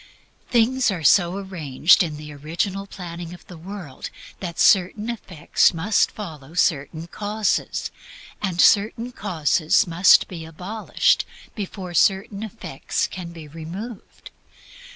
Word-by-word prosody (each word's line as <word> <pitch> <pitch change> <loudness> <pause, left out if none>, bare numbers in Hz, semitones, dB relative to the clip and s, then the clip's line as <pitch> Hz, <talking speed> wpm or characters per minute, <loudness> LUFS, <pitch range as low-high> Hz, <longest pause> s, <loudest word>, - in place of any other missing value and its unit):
Things 245 +2 +3
are 180 -5 -3
so 175 +4 +4
arranged 170 -6 +3
in 155 -4 -2
the 150 0 -9
original 175 +7 -3
planning 175 -2 -8
of 175 - -18
the 180 - -11
world 170 -5 -8 0.3
that 170 -3 -6
certain 210 +4 +3
effects 185 -6 +1
must 200 +6 +2
follow 160 -7 -9
certain 160 -3 0
causes, 210 +4 -2 0.5
and 185 -4 -2
certain 225 +5 +4
causes 165 - +1
must 175 +2 +5
be 170 -3 -7
abolished 205 - 0 0.3
before 190 -3 -6
certain 195 +4 +2
effects 220 -11 -3
can 175 -2 -7
be 165 -3 -10
removed. 175 +9 -9
180 Hz, 120 wpm, -23 LUFS, 165-205 Hz, 0.5 s, must